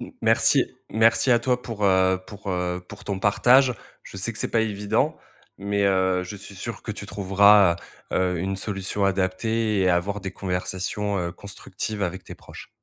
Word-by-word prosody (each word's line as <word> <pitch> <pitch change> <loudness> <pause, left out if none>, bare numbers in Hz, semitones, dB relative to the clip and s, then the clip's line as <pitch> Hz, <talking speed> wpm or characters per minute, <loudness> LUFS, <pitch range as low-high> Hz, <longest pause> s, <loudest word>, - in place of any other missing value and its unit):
M - - -8
merci - - +4 0.2
merci 115 +4 +3
à 120 - +5
toi 125 +1 0
pour, 110 -3 -4
heu 95 -1 +3
pour, 100 -1 -10
heu 90 -1 -2
pour - - -11
ton 100 -2 -3
partage. 125 +6 +4 0.3
Je - - -11
sais 100 +5 -2
que 110 - -8
c'est - - -2
pas 115 - +2
évident, 105 -2 0 0.4
mais 100 +1 -1
heu, 95 -1 +2
je 95 +3 -8
suis 100 0 -12
sûr 110 +5 -7
que 110 - -5
tu 100 0 -8
trouveras, 100 -1 +5 0.4
heu - - 0
heu, 90 -1 0
une 95 +3 -2
solution 100 0 -3
adaptée 100 +3 0
et 95 - +3
avoir 95 +4 0
des 95 -1 -5
conversations, 95 +2 -3
heu, 85 -1 -3
constructives 100 +2 -6
avec 95 +1 -4
tes - - -9
proches. - - -13
100 Hz, 185 wpm, -24 LUFS, 95-105 Hz, 0.4 s, à